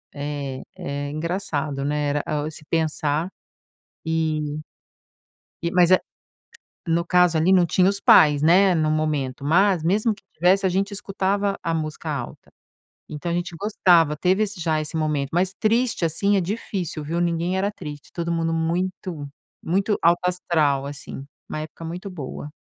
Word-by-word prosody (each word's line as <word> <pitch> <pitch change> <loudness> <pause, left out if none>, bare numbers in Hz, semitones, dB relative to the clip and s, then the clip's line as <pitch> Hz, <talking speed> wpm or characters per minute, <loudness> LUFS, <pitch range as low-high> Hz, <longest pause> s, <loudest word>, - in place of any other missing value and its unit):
É, 140 -2 -4 0.2
é 140 0 -4
engraçado, 155 -4 -2
né, 150 0 0
era, 145 0 0 0.2
oh, 150 - -3
esse 155 0 -10
pensar 155 0 0 0.8
e 155 -2 -1 1.0
e 170 - -1
mas 180 -1 +4
é 185 - +7 0.9
no 170 +1 +2
caso 180 -2 +3
ali 165 +4 +3
não 180 -2 +5
tinha 185 +3 +3
os 200 - -2
pais, 150 -5 +6
né, 185 +4 +5
no 155 -1 +1
momento, 145 -4 -1
mas 180 +2 +3
mesmo 210 +6 +2
que 200 - -21
tivesse, 185 +4 +3
a - - +4
gente 195 +3 -1
escutava 200 0 -1
a 165 0 -2
música 155 0 -4
alta. 140 -5 -6 0.6
Então 155 +3 -4
a - - 0
gente 175 -1 -3
gostava, 175 -7 +3
teve 185 +6 +2
esse 205 -2 -6
já 160 -2 0
esse 155 +2 -5
momento. 150 -3 0
Mas 185 +2 +2
triste, 230 -4 +2
assim, 200 +6 +1
é - - +2
difícil, 180 -5 -4
viu, 170 +3 -2
ninguém 175 +2 0
era 200 +2 0
triste, 150 -7 -9
todo 170 0 -3
mundo 165 0 0
muito 170 -2 -2 0.3
muito 195 +5 0
alto 170 +1 +4
astral, 155 -6 +1
assim, 140 -1 -8 0.2
uma 155 - -3
época 155 +1 -8
muito 180 +5 -6
boa. 145 -3 -7
165 Hz, 160 wpm, -23 LUFS, 150-185 Hz, 1.0 s, é